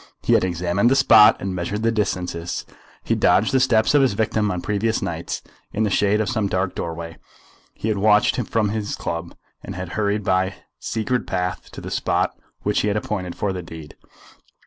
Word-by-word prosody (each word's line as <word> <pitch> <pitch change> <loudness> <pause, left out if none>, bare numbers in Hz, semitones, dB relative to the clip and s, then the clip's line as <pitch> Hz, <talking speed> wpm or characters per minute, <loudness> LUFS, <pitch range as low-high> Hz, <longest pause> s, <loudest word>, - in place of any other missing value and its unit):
He - - +2
had - - +4
examined 90 +4 +1
the 135 - +3
spot 110 -5 +7
and 95 -1 -3
measured 90 +5 -3
the 115 - +3
distances. 90 -5 -2 0.4
He - - -5
had - - +2
dogged 95 +7 +3
the 135 - +3
steps 120 -3 +3
of 145 - +5
his 130 -6 +3
victim 110 0 0
on 90 -2 -2
previous 105 +4 0
nights. - - -4 0.3
In 110 - 0
the 105 - 0
shade 105 +2 +2
of 110 - 0
some 110 -5 0
dark 95 0 -1
doorway 85 0 -5 0.6
he - - -4
had 105 -3 0
watched 105 0 +4
him 125 - -1
from 110 -2 0
his 105 -1 -3
club, 85 0 -5 0.3
and 95 - -7
had 90 -1 -5
hurried 105 +1 -1
by 95 0 +2
his 95 - -15 0.2
secret 120 +3 -2
path 90 -2 -3
to - - -8
the - - -7
spot - - 0 0.3
which 105 - +1
he - - 0
had 105 0 +1
appointed 95 -4 -3
for 100 -2 -1
the 90 - -4
deed. 80 -3 -10
100 Hz, 210 wpm, -22 LUFS, 90-110 Hz, 0.6 s, spot